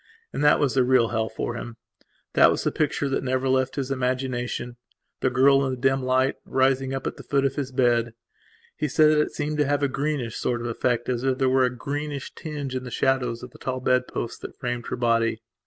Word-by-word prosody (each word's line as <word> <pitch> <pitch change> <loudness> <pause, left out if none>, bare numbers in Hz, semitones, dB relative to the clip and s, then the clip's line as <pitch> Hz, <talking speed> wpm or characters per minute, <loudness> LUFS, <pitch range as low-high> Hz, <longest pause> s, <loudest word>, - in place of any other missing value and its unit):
And - - -2
that 150 - +5
was 140 -4 +1
the 130 - +3
real 125 -2 +3
hell 110 -1 -1
for 110 - -4
him. 120 0 -7 0.6
That - - +6
was - - 0
the - - +1
picture 145 -2 0
that 135 - -1
never 130 0 0
left 130 0 +1
his 135 -1 -3
imaginationthe 125 -2 -2 0.6
girl, 135 +2 +5
in 130 -1 -1
the - - -13
dim 135 +1 +2
light, 130 +1 +1
rising 135 0 +1
up 135 0 -4
at - - -3
the - - -10
foot 140 -1 +1
of 135 - +1
his 135 -2 -4
bed. 120 -2 +1 0.6
He 150 - -1
said 155 +2 +4
that 150 -1 +4
it - - -1
seemed 150 0 -3
to 150 - +4
have 145 0 0
a - - +4
greenish 140 -4 -2
sort 120 -1 -1
of - - -5
effect 120 0 -1
as 125 -1 -1
if 130 -1 +1
there 130 -1 +2
were 130 0 +4
a - - +2
greenish 140 +2 -5
tinge 145 -4 -5
in 130 - -3
the 125 - -7
shadows 125 -2 0
of 125 - -9
the - - -16
tall 130 -1 -3
bedposts 125 -2 -1
that - - -9
framed 120 -2 -4
her - - -2
body. 115 -2 +1
130 Hz, 230 wpm, -25 LUFS, 125-135 Hz, 0.6 s, That